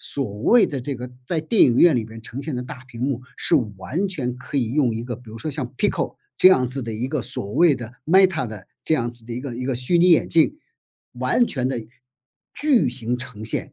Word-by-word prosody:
所 105 -7 -3
谓 235 - +5
的 140 - -4
这 135 +1 -4
个 125 +1 -7 0.2
在 165 +3 -1
电 175 +8 +3
影 120 - +5
院 170 +1 +6
里 120 -3 0
面 110 +1 -11
呈 120 +4 -7
现 145 -2 -4
的 125 - -3
大 125 0 -9
屏 115 -2 -10
幕， 130 -1 -1 0.2
是 - - +2 0.2
完 155 - -2
全 125 -9 -3
可 130 +3 -6
以 120 -3 0
用 135 -5 +2
一 115 +1 -4
个 120 0 -4
比 115 -1 -13
如 110 - -9
说 155 - -5
像 135 -4 -4
PICO 205 - -1 0.2
这 185 - +8
样 130 -9 +4
子 130 +2 -3
的 115 -1 -5
一 110 +4 -2
个 135 -2 -2
所 100 0 -4
谓 165 +1 +4
的 120 -2 -8
Meta 175 - +4
的 105 -3 -9 0.2
这 160 - +1
样 120 -2 -2
子 120 -1 -7
的 120 - -7
一 120 - -4
个 130 -3 -6
一 125 +2 -5
个 130 -1 -1
虚 125 +8 +1
拟 175 +1 +5
眼 165 - +4
镜， 165 - +3 0.5
完 240 - +2
全 130 -2 -1
地 120 -4 -4 0.7
巨 290 - +3
型 120 -1 -2
呈 125 -4 -7
现， 110 - -1
125 Hz, 290 characters per minute, -22 LUFS, 120-155 Hz, 0.7 s, 这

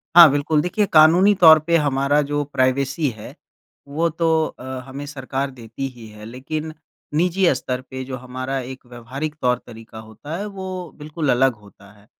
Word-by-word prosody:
हाँ, 170 -2 +11
बिल्कुल, 145 +2 +1
देखिए 200 +5 0
कानूनी 170 +6 +6
तौर 160 -2 +9
पे 170 - +3
हमारा 145 0 +1
जो 145 0 0
प्राइवेसी 135 +3 +1
है, 105 - -10 0.5
वो 165 +4 0
तो 165 +1 -3 0.2
अ, - - -13 0.2
हमें 135 +2 -7
सरकार 135 -1 -4
देती 120 +1 -7
ही 120 -3 -13
है, 105 0 -12
लेकिन 155 +7 -6 0.4
निजी 180 +3 +2
स्तर 125 0 -4
पे 130 0 -6
जो 130 0 -6
हमारा 130 +2 -5
एक 130 -1 -12
व्यावहारिक 130 +6 -6
तौर-तरीका 115 -3 -3
होता 110 +9 -9
है, 205 - -4
वो 185 -4 -7
बिल्कुल 150 -1 -2
अलग 130 +1 +3
होता 100 -1 -18
है। 105 - -22
140 Hz, 165 wpm, -21 LUFS, 125-160 Hz, 0.5 s, हाँ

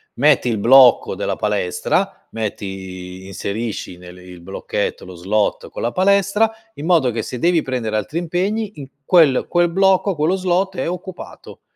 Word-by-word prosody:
metti 140 -1 +3
il 115 -3 0
blocco 130 +3 +6
della - - -2
palestra, 105 -4 -1
metti 110 -2 -4
i 95 -1 -8
inserisci 100 -1 -5
nel 90 0 -13
il 90 -1 -13
blocchetto 95 +3 -4
lo 90 - -10
slot 100 +5 -1
con - - -7
la 120 - -1
palestra, 200 - +2 0.2
in 145 - -7
modo 165 -7 +3
che 115 -2 -3
se 125 - -6
devi 170 +1 +2
prendere 120 -5 -3
altri 110 +10 -3
impegni 195 +5 -2
in 140 -2 -9 0.2
quel 155 -5 +4
quel 175 0 +2
blocco, 190 +2 +3
quello 155 +4 +1
slot 190 +1 0
è - - -2
occupato. 180 +1 -8
130 Hz, 165 wpm, -19 LUFS, -, 0.2 s, blocco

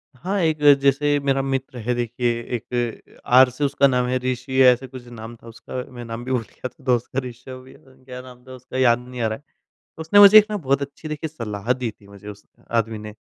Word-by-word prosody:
हाँ, 190 +9 -3
एक 160 -2 0 0.2
जैसे 145 +1 +2
मेरा 135 -1 0
मित्र 135 -1 -4
है 125 - +1
देखिए 120 0 -1 0.3
एक 120 0 -5
आर 130 +1 +6
से 130 +4 -5
उसका 140 0 +3
नाम 125 -2 +1
है 130 +1 0
ऋषि 130 +1 -1
या 130 - +8
ऐसा 125 +2 -3
कुछ 125 -1 -12
नाम 115 -1 -10
था 115 - -18
उसका 115 - -12 0.2
मैं 120 -1 -8
नाम 115 +1 -7
भी 130 - -4
भूल 125 -2 +1
गया 115 - -8
था 145 - -25
दोस्त 125 -2 +1
का 130 - 0
ऋषव 130 +1 -11
या 130 - -16 0.3
क्या 125 -1 -9
नाम 125 -1 -15
था 130 - -11
उसका, 130 0 -9
याद 120 -2 +3
नहीं 125 -1 -7
आ 115 - +1
रहा 110 0 -3
है। 145 - -25 0.6
उसने 165 +6 +3
मुझे 205 +1 +10
एक 215 - +8
ना 210 - -2
बहुत 140 -5 0
अच्छी 140 +3 -7
देखिए 155 +1 -4
सलाह 115 -6 -4
दी 125 -3 -4
थी 105 -1 -22
मुझे 100 0 -14
उस 105 0 -11 0.3
आदमी 115 -1 0
ने 105 0 -9
125 Hz, 240 wpm, -22 LUFS, 120-135 Hz, 0.6 s, मुझे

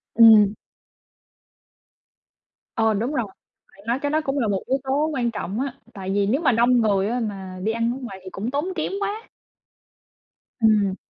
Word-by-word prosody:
Ừm. 215 -3 +7 2.2
Ờ, 225 -1 +3
đúng 235 +8 -2
rồi, 240 -5 0 0.5
bạn 195 +2 -19
nói 245 +3 0
cái 285 0 -2
đó 310 +1 +1
cũng 275 0 -2
là 225 - +1
một 195 -2 0
yếu 265 - +1
tố 275 +3 +1
quan 240 -3 0
trọng 210 +1 -4
á, 270 -2 -2 0.2
tại 190 -1 -6
vì 200 0 +2
nếu 265 +10 +1
mà 270 - +3
đông 240 +1 +3
người 200 -2 +2
á 245 +1 -1
mà 190 -4 -5
đi 220 - +1
ăn 230 +1 0
ở - - -6
ngoài 195 -6 -7
thì 185 - -8
cũng 215 +7 -4
tốn 290 +4 -1
kém 315 - -2
quá. 415 +3 -3 1.3
Ừm. 205 -3 +3
230 Hz, 185 wpm, -23 LUFS, 205-265 Hz, 2.2 s, Ừm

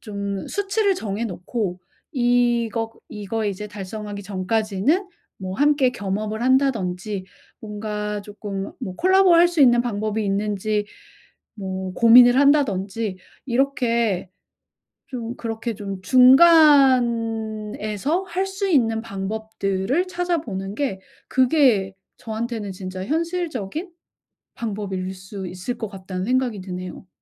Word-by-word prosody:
좀 200 -2 -5
수치를 405 0 0
정해 215 - -3
놓고 185 -1 -4 0.3
이것 240 -3 +1 0.2
이거 215 +1 -4
이제 205 +1 -4
달성하기 205 0 -7
전까지는 210 - 0 0.3
뭐 185 -1 -5
함께 285 -2 +3
겸업을 215 -1 -3
한다든지 215 -7 0 0.4
뭔가 210 -1 -4
조금 200 -1 -6
뭐 185 - -5
콜라보를 375 -1 +5
할 350 - +6
수 345 -3 -2
있는 240 -2 +6
방법이 215 -2 -2
있는지 205 +1 -1 0.7
뭐 190 -2 -5
고민을 245 +2 +7
한다든지 225 -8 +2 0.3
이렇게 235 -7 0 0.8
좀 240 -2 -5
그렇게 230 0 -4
좀 195 -2 -6
'중간에서 250 - +4
할 375 0 -2
수 390 +1 -3
있는 225 -9 +2
방법들을 220 - -2
찾아보는 320 - -3
게 265 -10 -2 0.3
그게 250 -8 +3 0.2
저한테는 225 -2 -4
진짜 185 0 -6
현실적인 330 - -3 0.6
방법일 195 -4 -4
수 190 +1 -8
있을 185 +7 -5
것 220 - -4
같다.'는 185 -2 -6
생각이 250 -4 0
드네요. 185 0 -7
220 Hz, 245 characters per minute, -22 LUFS, 195-260 Hz, 0.8 s, 고민을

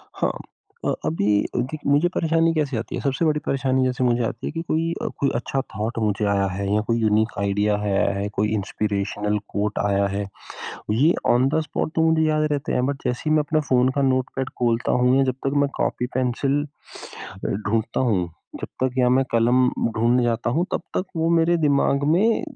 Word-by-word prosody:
हाँ, - - 0 0.5
अ, - - +2
अभी 80 +6 0 0.3
क्योंकि 130 +5 -2
मुझे 145 +5 +4
परेशानी 165 0 +2
कैसे 145 -6 -1
आती 115 - -4
है - - -4
सबसे 140 +4 0
बड़ी 150 -1 +2
परेशानी 130 -1 +1
जैसे 130 0 -1
मुझे 120 -1 +2
आती 115 +1 -4
है - - -3
कि 165 - -4
कोई 165 0 -1
अ, - - -2
कोई 140 - +2
अच्छा 135 +3 -1
थॉट 110 +3 -3
मुझे 105 -1 0
आया 100 -1 +2
है 95 +1 -3
या 105 - +2
कोई 115 0 +2
यूनिक 110 0 +2
आइडिया 105 +1 +1
है 105 -1 -1
आया - - +2
है, 100 - -2
कोई 105 +1 0
इंस्पिरेशनल 105 0 -2 0.2
कोट 105 +1 -1
आया 100 0 +2
है। 100 +1 -3 0.7
ये 145 +10 +3 0.2
ऑन 130 +2 +3
द 160 +2 +1
स्पॉट 155 0 -3
तो 160 - +2
मुझे 160 0 +2
याद 155 0 +1
रहते 145 -1 -2
हैं, 125 - +1
बट 140 0 -3
जैसे 125 +5 -2
ही 155 - +4
मैं 150 - +3
अपना 155 +1 0
फ़ोन 125 0 +4
का 140 - +2
नोटपैड 130 0 0
खोलता 115 -1 +1
हूँ 125 +1 +4
या 135 - +4
जब 130 -2 0
तक 135 - 0
मैं 140 - +2
कॉपी 125 - 0
पेंसिल 130 +3 0 0.6
अ, - - -11
ढूँढ़ता 110 +2 -1
हूँ 90 -5 +1 0.3
जब - - -5 0.2
तक 125 - -1
या 125 - +4
मैं 130 +2 +3
कलम 120 +2 +3 0.2
ढूँढ़ने 120 +3 +2
जाता 120 0 0
हूँ 165 +8 0
तब - - -1
तक 185 - 0
वो 165 0 +1
मेरे 170 +1 +3
दिमाग 140 0 +2
में 220 +5 +2
125 Hz, 210 wpm, -23 LUFS, 105-145 Hz, 0.7 s, मुझे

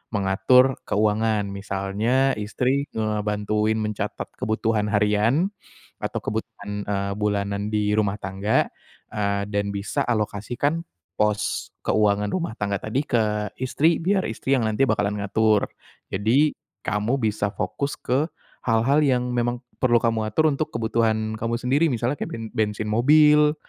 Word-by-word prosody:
mengatur 125 +7 +4
keuangan. 105 0 +1
Misalnya 100 +7 0
istri 130 +7 0
ngebantuin 105 0 0
mencatat 105 -1 -3
kebutuhan 110 -1 0
harian, 105 - +2 0.5
atau - - -2
kebutuhan, 105 -2 -5
eee, 100 -1 -2
bulanan 100 0 -1
di 105 -1 +1
rumah 105 -1 0
tangga, 95 +2 0 0.5
eee, 100 -1 0
dan 100 -1 -1
bisa 100 0 -2
alokasikan 120 +8 -1 0.3
pos 105 0 0 0.2
keuangan 105 -1 +2
rumah 170 - -2
tangga 100 -1 0
tadi 110 +5 -1
ke 105 -2 +1
istri, 155 +6 +1
biar 190 +2 +1
istri 115 +4 -4
yang 110 - 0
nanti 110 +4 +1
bakalan 105 -4 +1
ngatur. 110 +1 +2 0.4
Jadi, 120 +10 +3 0.3
kamu 105 +5 0
bisa 105 -1 +1
fokus 140 +7 -2
ke 135 +5 0 0.4
hal-hal 120 +6 +3
yang 125 -2 +1
memang 120 +1 -1 0.2
perlu 125 -2 +3
kamu 115 -2 +1
atur 155 +9 +2
untuk 145 +2 -1
kebutuhan 110 -1 0
kamu 115 +1 -1
sendiri, 135 +7 +2
misalnya 125 +1 -1
kek - - -3
ben 115 -1 -6
bensin 105 0 -1
mobil, 150 +5 +5
110 Hz, 130 wpm, -24 LUFS, 105-125 Hz, 0.5 s, mobil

